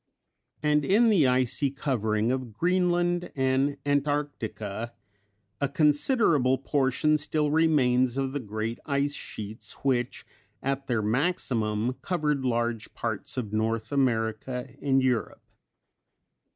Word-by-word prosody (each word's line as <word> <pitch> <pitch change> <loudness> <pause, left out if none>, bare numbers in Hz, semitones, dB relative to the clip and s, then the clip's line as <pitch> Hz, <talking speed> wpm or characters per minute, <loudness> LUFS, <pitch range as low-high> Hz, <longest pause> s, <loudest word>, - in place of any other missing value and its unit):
And 150 0 +3
in 220 +9 +4
the 175 -11 +4
icy 130 +2 +2
covering 115 -5 0
of 130 -3 -3
Greenland 175 0 +1
and 135 +1 +1
Antarctica 140 -7 -2 0.7
a 140 - 0
considerable 150 - +3
portion 140 +2 +1
still 150 0 0
remains 130 -6 +3
of 135 -1 -1
the 145 - -1
great 110 0 -4
ice 140 0 0
sheets 110 -5 -7
which 125 -3 0 0.4
at 135 0 -2
their 115 -4 0
maximum 115 - 0
covered 150 -6 -1
large 120 -3 -1
parts 115 +2 -4
of 110 -5 -3
North 110 +1 -1
America 125 -2 -1
and 135 -2 +2
Europe. 125 -3 -1
130 Hz, 110 wpm, -27 LUFS, 115-150 Hz, 0.7 s, in